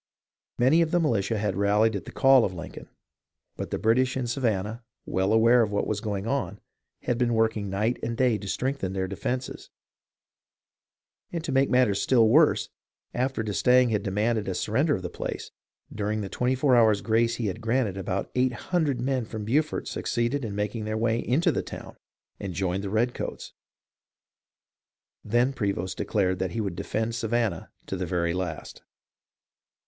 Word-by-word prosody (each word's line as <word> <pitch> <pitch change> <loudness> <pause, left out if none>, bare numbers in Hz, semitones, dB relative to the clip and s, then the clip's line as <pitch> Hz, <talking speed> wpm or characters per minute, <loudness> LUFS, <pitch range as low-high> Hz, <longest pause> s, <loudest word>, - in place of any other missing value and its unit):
Many 135 +7 +4
of 165 - +2
the 175 - +2
militia 115 - +1
had 105 -2 -1
rallied 105 +2 +2
at 95 - -5
the - - -8
call 135 -2 +5
of 95 - -2
Lincoln, 85 0 -9 0.7
but - - -5
the - - -2
British 125 +4 +2
in 130 - -1
Savan 115 -6 0
nah, 110 +2 -6 0.3
well 95 +2 0
aware 115 +2 +5
of 110 -2 0
what 100 - 0
was 105 -1 -2
going 100 -2 -3
on, 135 +3 -2 0.4
had 120 -1 -1
been 120 -2 +2
working 110 -2 +1
night 105 +5 0
and 115 0 -3
day 125 -4 +2
to 100 - -8
strengthen 125 -4 -2
their 95 -1 -1
defences, 125 +6 -4 1.6
and 170 -2 -4
to 165 - -3
make 135 +1 +3
matters 125 -6 +3
still 115 -4 +4
worse, 150 +7 +4 0.4
after 130 -2 -1
d'Estaing 125 +4 +3
had 105 - +1
demanded 105 +2 0
a 95 - -2
sur - - -3
render 145 +7 +2
of 95 - -6
the 90 - -3
place, - - -5 0.4
during 105 0 -2
the 100 - -5
twenty 125 +5 0
four 130 0 +3
hours' 110 -4 +4
grace 115 +1 +2
he 115 - -3
had 100 +2 -3
granted 115 -3 0
about 95 0 -3
eight 125 0 +1
hundred 150 -1 -1
men 130 0 0
from 110 -1 -6
Beaufort 150 +7 0
suc - - -5
ceeded 120 +4 0
in 105 -3 -4
making 105 +2 -2
their 110 0 -2
way 115 +1 +1
into 135 +9 +2
the - - -1
town - - -9 0.4
and 95 -3 -5
joined 95 +1 -1
the 100 - -3
redcoats. 115 +4 -2 1.7
Then 120 +5 +2
Prevost 100 -6 -2
declared 95 -3 0
that 95 -1 -2
he 115 - -2
would 100 -5 -2
defend 110 +5 -2
Savannah 115 -5 -1 0.2
to - - -4
the 90 -1 -3
very 85 -1 0
last. 90 -3 -5
110 Hz, 180 wpm, -26 LUFS, 100-125 Hz, 1.7 s, call